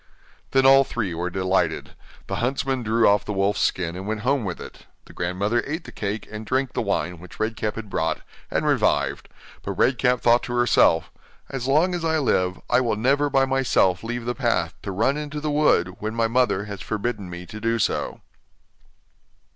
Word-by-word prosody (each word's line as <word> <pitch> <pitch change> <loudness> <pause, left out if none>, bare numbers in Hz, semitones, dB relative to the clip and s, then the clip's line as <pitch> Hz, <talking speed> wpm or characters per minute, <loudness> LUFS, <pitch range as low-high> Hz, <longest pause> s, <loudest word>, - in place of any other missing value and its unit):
Then 135 0 +3
all 135 +1 +8
three 110 -9 -3
were 85 +2 -2
delighted. 95 -3 0 0.3
The - - -4
huntsman 130 +1 -1
drew 115 0 +3
off 100 0 +4
the 105 - -4
wolf's 100 +1 +1
skin 85 -2 0
and 95 +2 -6
went 110 0 -2
home 135 +2 +1
with 95 -4 -4
it; - - -11 0.2
the - - -15
grandmother 100 +7 -1
ate 160 +4 -3
the - - -11
cake 100 0 -4
and 110 0 -6
drank 130 +3 -1
the - - -1
wine 90 -5 -2
which 90 +1 -13
Red 110 +1 -1
Cap 105 -1 -2
had 115 -1 -6
brought, 80 -4 -1 0.3
and - - -1
revived, - - +1 0.3
but - - -4
Red 125 -1 +2
Cap 125 -1 +2
thought 120 0 +4
to 120 - -4
herself: 120 -8 +3 0.4
'As 135 -2 -3
long 160 +7 +3
as 175 -2 -3
I 160 -1 +1
live, 90 - +1
I - - +3
will 115 -4 0
never 140 +6 +2
by 135 -1 +3
myself 130 -9 +2
leave 120 +1 -4
the 120 - -1
path, - - 0
to 100 - -5
run 115 +9 +1
into 150 0 -4
the 150 0 -2
wood, 120 - +2
when 110 +1 -4
my 115 -1 +2
mother 115 -4 +1
has 100 -2 -7
forbidden 110 -3 -3
me 90 0 -7
to 110 +5 -9
do 115 +1 +1
so. 105 - -1
115 Hz, 200 wpm, -24 LUFS, 95-130 Hz, 0.4 s, all